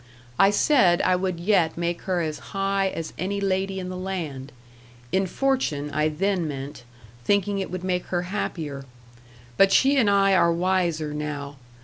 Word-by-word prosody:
I 195 - +7
said 205 - +4
I 185 - +3
would 180 -2 -2
yet 170 -4 +2
make 170 0 -2
her 180 -2 +1
as 155 -2 -3 0.2
high 195 0 +1
as 165 -4 -5
any 200 +3 -2
lady 190 0 -1
in 180 -1 -5
the 185 - -5
land, 165 -8 -5 0.6
in 190 0 +1
fortune 180 - -1
I 150 +1 +1
then 180 +2 -1
meant, 135 -2 -7 0.4
thinking 200 +4 +1
it 190 - -3
would 185 0 -5
make 180 -1 -1
her 175 -1 -1
happier; 160 -7 -4 0.7
but 195 0 +5
she 275 +6 +4
and 230 -6 +4
I 195 -1 +4
are 170 -2 +4
wiser 170 -3 0
now. 145 -1 -5
180 Hz, 165 wpm, -24 LUFS, 155-195 Hz, 0.7 s, I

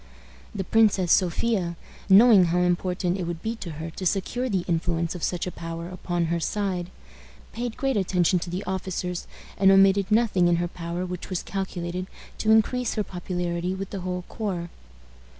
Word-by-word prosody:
The 195 - -2
Princess 200 -3 +3
Sophia, 185 -1 +2 0.3
knowing 200 -1 +8
how 175 +1 +1
important 180 +1 0
it 180 - -2
would 170 -1 -5
be 225 +1 -2
to 170 -7 -6
her 160 +2 -6
to 185 - -6
secure 240 +7 -1
the 190 -5 -1
influence 170 -1 0
of 180 - -7
such 175 +1 -1
a 180 - -4
power 165 0 -6
upon 175 -2 -2
her 170 +1 0
side, 185 -1 -2 0.6
paid 235 0 -4
great 270 -2 0
attention 180 -2 +2
to 175 - -6
the 180 +3 -3
officers, 185 -1 -3 0.3
and 195 0 +6
omitted 195 0 +5
nothing 210 -5 +3
in 175 - +4
her 175 +1 0
power 170 +1 -4
which 180 -1 -6
was 185 -3 -2
calculated 185 -2 -4 0.3
to 215 - 0
increase 225 +3 +3
her 215 - 0
popularity 180 -1 -3
with 195 0 -6
the 195 - -4
whole 180 0 -3
corps. 185 -6 -4
180 Hz, 175 wpm, -25 LUFS, 175-195 Hz, 0.6 s, knowing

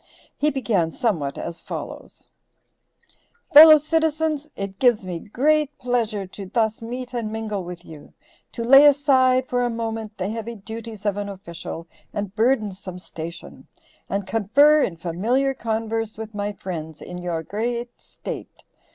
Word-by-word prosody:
He 300 - +2
began 225 - 0
somewhat 165 - -1
as 170 - -6
follows: - - -8 1.3
"Fellow 310 +1 +11
citizens: 310 -1 0
It 195 -1 -6
gives 240 -6 +3
me 175 -2 -4
great 295 - +1
pleasure 230 -5 -1
to 190 +1 -9
thus 220 +1 0
meet 245 +2 -6
and 230 -3 -3
mingle 215 -3 -3
with 175 0 -9
you, 155 -2 -12 0.4
to 235 - -4
lay 270 +4 +8
aside 260 -3 +4
for 245 0 0
a 245 - +1
moment 225 -2 -4
the 185 - -2
heavy 225 +2 -5
duties 220 0 -8
of 205 -1 0
an 205 0 -3
official 170 -3 -8 0.3
and 205 -2 -3
burdensome 210 -6 0
station, 170 -2 -9 0.4
and 200 0 -2
confer 280 +10 +4
in 170 -9 -1
familiar 225 +12 0
converse 225 -2 -3
with 220 0 -7
my 205 0 -2
friends 160 -6 -7
in 180 - -7
your 170 -2 -3
great 235 +6 -4
state. - - -8
220 Hz, 145 wpm, -23 LUFS, 190-250 Hz, 1.3 s, Fellow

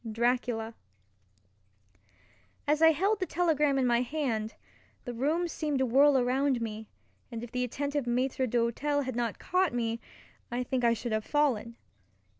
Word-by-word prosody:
—Dracula. 235 -1 0 1.9
As 300 +2 +2
I 320 - +8
held 390 +7 +1
the 370 - -1
telegram 300 -5 +2
in 265 - +2
my 240 -1 +3
hand, 240 -5 -2 0.5
the 245 - -4
room 305 +9 0
seemed 305 -3 -2
to 265 - +2
whirl 275 +3 +5
around 260 +1 +1
me, 220 -1 -5 0.4
and 230 0 -5
if 240 - -8
the 250 0 -1
attentive 280 +2 -2
maitre 255 +2 0
d'hotel 245 +5 0
had 260 -2 -4
not 235 -2 -1
caught 365 -6 0
me, 230 -1 -1 0.5
I 245 +1 -2
think 250 0 -2
I 235 0 +4
should 230 +1 -5
have 215 0 0
fallen. 245 -6 0
250 Hz, 155 wpm, -29 LUFS, 235-290 Hz, 1.9 s, I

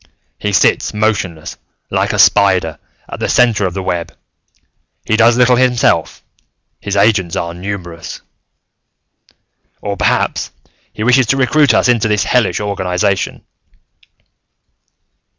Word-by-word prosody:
He 105 - -2
sits 95 +2 +1
motionless, 95 -7 -2 0.3
like - - 0
a - - -3
spider, 95 -6 +3 0.3
at - - -8
the - - -2
center 115 -5 +2
of 90 - -7
the 95 - -4
web; 85 -2 -3 0.9
he 110 - +1
does 115 +1 +4
little 125 0 +4
himself; 125 -2 +1 0.6
his 100 -1 -4
agents 100 -4 +2
are 85 0 -3
numerous. 90 -2 -7 1.6
"Or, 100 -1 -4
perhaps, - - 0 0.4
he 110 - -6
wishes 125 +1 +3
to 135 - +1
recruit 135 -1 +3
us - - +2
into 115 -3 +2
this 105 -1 +1
hellish 125 -5 +1
organization." 100 -1 -2
105 Hz, 120 wpm, -15 LUFS, 95-120 Hz, 1.6 s, does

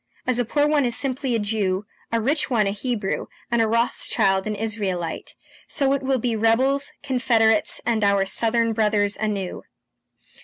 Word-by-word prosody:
As 250 -1 +1
a 245 - +1
poor 290 +6 +1
one 300 -1 +2
is 240 -2 +1
simply 260 -1 -1
a - - +1
Jew, 205 -2 -1 0.3
a 230 - +1
rich 290 +8 0
one 225 -5 +2
a 195 - 0
Hebrew, 210 -1 -3 0.2
and 235 -1 +2
a 225 - +2
Rothschild 215 -3 +1
an 215 - -2
Israelite, 200 -5 -3 0.3
so 275 -1 0
it 275 - -1
will 265 0 0
be 235 -1 -1
rebels, 260 +6 +2
Confederates, 230 -5 +2
and 225 -3 0
our 200 -1 +3
Southern 230 +2 +1
brothers 210 -2 +1
anew!" 205 -4 -3
225 Hz, 165 wpm, -23 LUFS, 210-250 Hz, 0.3 s, our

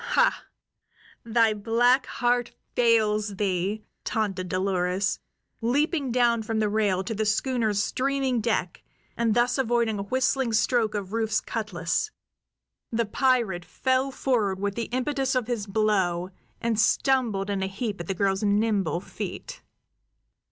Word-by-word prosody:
"Hah! - - +2 0.8
Thy 230 -1 +3
black 240 +5 +2
heart 245 0 0 0.2
fails 215 -3 +2
thee!" 195 +2 -1 0.2
taunted 195 -4 -2
Dolores, 185 0 0 0.4
leaping 280 +3 +1
down 235 -1 +3
from 220 0 -3
the 215 -1 +1
rail 205 -3 +1
to 210 - -3
the 220 0 -1
schooner's 215 -1 +1
streaming 265 -2 0
deck 210 -6 -1 0.3
and 230 -2 +1
thus 245 +2 +2
avoiding 235 -4 +1
a - - -1
whistling 255 +3 0
stroke 220 0 +2
of 200 -1 -4
Rufe's 220 -1 +1
cutlas. 210 - -2 0.8
The 230 0 +1
pirate 225 -6 +1
fell 260 +7 0
forward 225 -8 0
with 200 0 -1
the 230 +2 -3
impetus 265 +1 -1
of 250 -3 +1
his 225 -3 -3
blow, 190 -4 +1 0.3
and 230 -2 0
stumbled 220 -4 +2
in 195 -1 -1
a 190 - 0
heap 205 +1 -4
at 170 - -8
the 195 - -2
girl's 195 0 +1
nimble 205 -4 +1
feet. - - -7
220 Hz, 135 wpm, -26 LUFS, 200-245 Hz, 0.8 s, Thy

